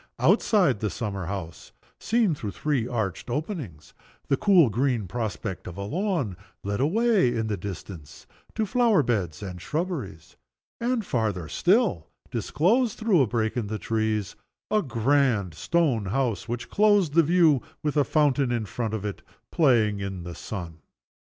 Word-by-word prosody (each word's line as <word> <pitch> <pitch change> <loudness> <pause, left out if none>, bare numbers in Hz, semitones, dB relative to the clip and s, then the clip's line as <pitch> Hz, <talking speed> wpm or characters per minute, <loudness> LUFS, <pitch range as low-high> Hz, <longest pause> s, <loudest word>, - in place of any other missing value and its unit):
Outside 180 - +3
the 105 - -1
summer 100 -2 -4
house, 85 -5 -6 0.3
seen 225 -6 +2
through 110 -8 -5
three 135 +2 -1
arched 110 -4 -3
openings, 130 - -5 0.4
the 140 - +4
cool 170 - +4
green 120 -2 0
prospect 105 -2 -4
of 90 0 -8
a 100 - -4
lawn 160 - -1 0.3
led 100 +2 -2
away, 200 - +3
in 110 -1 -1
the 110 -1 -1
distance, 90 -6 -8 0.3
to 220 - 0
flower 225 -5 +3
beds 100 - -2
and 90 -3 -7
shrubberies, 150 - -4 0.4
and, 235 -2 0
farther 105 - -1
still, 185 - +2 0.2
disclosed, 220 - +1
through 215 -8 +3
a 130 - +3
break 110 0 -1
in 120 -4 -2
the 110 +1 -3
trees, 110 -2 -1 0.4
a 215 - +3
grand 120 - +1
stone 130 - +1
house 120 0 -1
which 120 0 -4
closed 205 -7 +3
the 165 - +6
view, 165 -4 +4 0.2
with 150 -1 -1
a 145 - +4
fountain 140 -3 +2
in 115 -2 -1
front 110 +4 -3
of 105 -1 -5
it 100 - -4 0.3
playing 115 -9 +3
in 95 -2 -5
the 85 0 -7
sun. 85 -5 -7
120 Hz, 155 wpm, -26 LUFS, 100-165 Hz, 0.4 s, the